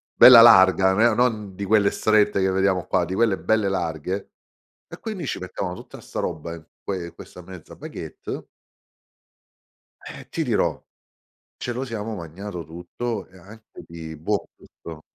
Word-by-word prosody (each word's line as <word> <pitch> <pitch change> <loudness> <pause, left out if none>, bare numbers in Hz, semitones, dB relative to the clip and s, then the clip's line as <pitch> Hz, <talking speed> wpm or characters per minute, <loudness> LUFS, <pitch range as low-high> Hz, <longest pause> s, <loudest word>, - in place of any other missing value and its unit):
Bella 125 -2 +10
larga, 95 -4 +7
non 95 +3 +1
era 120 -1 +5
non 110 -5 0
di 100 - -5
quelle 100 0 +3
strette 105 -2 +2
che 95 - +2
vediamo 95 -1 +1
qua, 90 -1 +1
di 90 - -5
quelle 110 -1 +2
belle 110 -2 +1
larghe. 95 +1 -3 0.6
E - - -10
quindi 205 -8 -5
ci - - -3
mettevano 90 0 -5
tutta - - -12
'sta - - -6
roba 85 0 -4
in 80 -1 -12 0.2
que 95 -3 -4
in 85 - -12
questa 90 - -12
mezza 90 -2 -12
baguette - - -8 1.6
eh, - - -10
ti - - -2
dirò, - - 0 0.7
ce - - -5
lo 125 +3 -3
siamo 115 -2 -5
magnato 90 0 -7
tutto 90 +7 -5
e 95 - -18
anche 110 +5 -14
di, 80 -2 -9
boh, 100 +7 -2
gusto. 80 -2 -12
95 Hz, 160 wpm, -23 LUFS, 90-110 Hz, 1.6 s, Bella